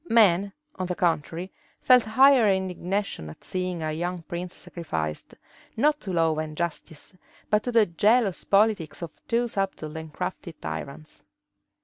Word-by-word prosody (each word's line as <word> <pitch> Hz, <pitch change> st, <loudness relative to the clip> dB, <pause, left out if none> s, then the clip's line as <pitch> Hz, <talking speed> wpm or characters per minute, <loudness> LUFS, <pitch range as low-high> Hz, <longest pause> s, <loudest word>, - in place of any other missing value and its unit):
Men, 200 Hz, -4 st, +4 dB, 0.3 s
on 185 Hz, -, -2 dB
the 180 Hz, -, -2 dB
contrary, 170 Hz, +1 st, -1 dB, 0.3 s
felt 250 Hz, -1 st, +6 dB
higher 255 Hz, 0 st, +6 dB
indignation 190 Hz, -, -2 dB
at 75 Hz, -, -13 dB
seeing 180 Hz, -2 st, -3 dB
a 155 Hz, -, -1 dB
young 175 Hz, +2 st, -3 dB
prince 175 Hz, +2 st, -6 dB
sacrificed, 80 Hz, -, -5 dB, 0.4 s
not 295 Hz, +5 st, +3 dB
to 195 Hz, -, -5 dB
law 165 Hz, -3 st, +2 dB
and 155 Hz, -1 st, -5 dB
justice, 165 Hz, -2 st, -5 dB, 0.4 s
but 210 Hz, 0 st, +4 dB
to 245 Hz, -, -3 dB
the 230 Hz, -2 st, +5 dB
jealous 205 Hz, +3 st, +2 dB
politics 195 Hz, -6 st, +2 dB
of 165 Hz, -, -5 dB, 0.2 s
two 240 Hz, +1 st, +1 dB
subtle 195 Hz, -8 st, -3 dB
and 160 Hz, -1 st, -7 dB
crafty 180 Hz, 0 st, -5 dB
tyrants. 140 Hz, -, -7 dB
180 Hz, 145 wpm, -26 LUFS, 160-210 Hz, 0.4 s, felt